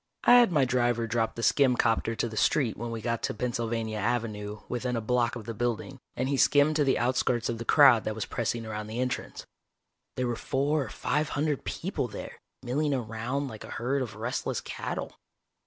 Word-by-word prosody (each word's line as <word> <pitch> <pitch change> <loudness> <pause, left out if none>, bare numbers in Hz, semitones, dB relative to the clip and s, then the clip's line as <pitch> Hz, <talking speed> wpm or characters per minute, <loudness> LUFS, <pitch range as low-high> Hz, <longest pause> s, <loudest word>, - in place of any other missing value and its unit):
I - - +7
had 235 -6 +4
my 145 -5 +3
driver 120 -2 +1
drop 115 0 -1
the 115 - -5
skim 130 -2 +4
copter 115 0 +1
to 115 - -1
the 110 - -8
street 120 0 +2
when 120 +1 -5
we 115 -1 -4
got 115 -1 -1
to - - -2
Pennsylvania 115 -2 -2
Avenue 105 -2 -2
within 125 0 -2
a - - 0
block 120 +1 +1
of 115 -3 -7
the 115 - -4
building, 120 +4 -3 0.2
and 130 - -1
he 140 0 0
skimmed 145 +3 +4
to 150 - +3
the 135 - +2
outskirts 125 -1 +1
of 115 -1 -3
the 115 - -5
crowd 135 -6 +6
that 110 - -2
was 110 - -3
pressing 115 0 -2
around 105 -1 -5
the 110 +2 -5
entrance. 125 -1 -3 0.7
There 130 - -1
were 120 -1 -1
four 140 +4 0
or - - -8
five 150 +5 -1
hundred 145 -1 -1
people - - -2
there, - - -8 0.2
milling 140 +3 0
around 125 +4 -3
like 110 -5 -8
a - - -10
herd 135 +4 0
of 120 -5 -4
restless 115 +4 -2
cattle. - - -5
120 Hz, 205 wpm, -28 LUFS, 115-130 Hz, 0.7 s, I